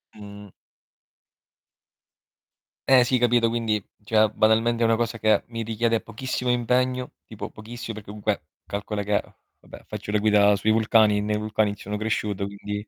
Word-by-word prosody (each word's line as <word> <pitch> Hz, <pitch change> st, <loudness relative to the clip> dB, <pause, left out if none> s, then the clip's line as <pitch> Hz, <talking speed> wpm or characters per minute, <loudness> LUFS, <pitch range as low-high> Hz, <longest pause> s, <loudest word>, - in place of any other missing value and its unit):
Mh. 100 Hz, -1 st, -11 dB, 2.4 s
Eh 130 Hz, -2 st, +7 dB
sì, 125 Hz, +1 st, +1 dB
capito, 120 Hz, -1 st, +3 dB
quindi 115 Hz, -3 st, -1 dB, 0.2 s
cioè 110 Hz, -1 st, +3 dB
banalmente 115 Hz, +2 st, +2 dB
è -, -, +4 dB
una 115 Hz, 0 st, +3 dB
cosa 115 Hz, 0 st, -2 dB
che 110 Hz, -1 st, +3 dB
mi 115 Hz, -1 st, -5 dB
richiede 115 Hz, +1 st, 0 dB
pochissimo 125 Hz, +3 st, -4 dB
impegno, 125 Hz, +1 st, 0 dB
tipo -, -, -7 dB
pochissi 115 Hz, +2 st, -8 dB
perché 110 Hz, -2 st, -9 dB
comunque 105 Hz, -3 st, -2 dB, 0.2 s
calcola 105 Hz, 0 st, -4 dB
che 105 Hz, 0 st, +1 dB, 0.4 s
vabbè, -, -, -14 dB
faccio -, -, -8 dB
la 105 Hz, -, +3 dB
guida 105 Hz, -1 st, +4 dB
sui 105 Hz, +2 st, +1 dB
vulcani 110 Hz, -1 st, +4 dB
e -, -, 0 dB
nei 105 Hz, +1 st, -1 dB
vulcani 105 Hz, -1 st, 0 dB
sono 105 Hz, +1 st, -5 dB
cresciuto, 105 Hz, -2 st, -2 dB
quindi 105 Hz, +1 st, -6 dB
110 Hz, 155 wpm, -24 LUFS, 105-115 Hz, 2.4 s, Eh